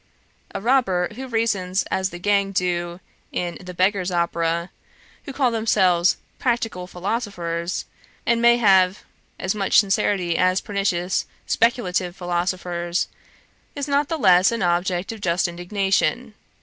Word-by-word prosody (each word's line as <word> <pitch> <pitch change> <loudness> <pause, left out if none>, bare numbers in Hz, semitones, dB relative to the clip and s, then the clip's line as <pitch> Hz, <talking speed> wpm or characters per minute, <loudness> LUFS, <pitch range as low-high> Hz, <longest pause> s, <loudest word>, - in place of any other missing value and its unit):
A - - -1
robber 195 -7 +2
who 260 +4 -7
reasons 205 -6 0
as 190 0 0
the 175 - -8
gang 200 +1 +1
do 175 -1 -1 0.3
in 175 -1 -3
the 180 0 -8
Beggar's 185 +1 +1
Opera, 170 0 -1 0.5
who 280 - -6
call 260 -2 +1
themselves 190 -6 +2 0.2
practical 225 -7 -1
philosophers, 180 -3 -3 0.4
and 235 0 +2
may 235 0 +6
have 190 -4 +4 0.4
as 190 0 -1
much 200 -2 +3
sincerity 195 -4 +1
as 185 +1 +3
pernicious 190 -3 -1 0.2
speculative 185 -7 0
philosophers, 175 -1 -2 0.7
is 285 0 -3
not 280 0 +1
the 325 - -1
less 185 - +5
an 230 -4 -2
object 175 +2 0
of 220 -2 -9
just 180 -1 +1
indignation. 195 +6 -1
185 Hz, 130 wpm, -22 LUFS, 175-220 Hz, 0.7 s, may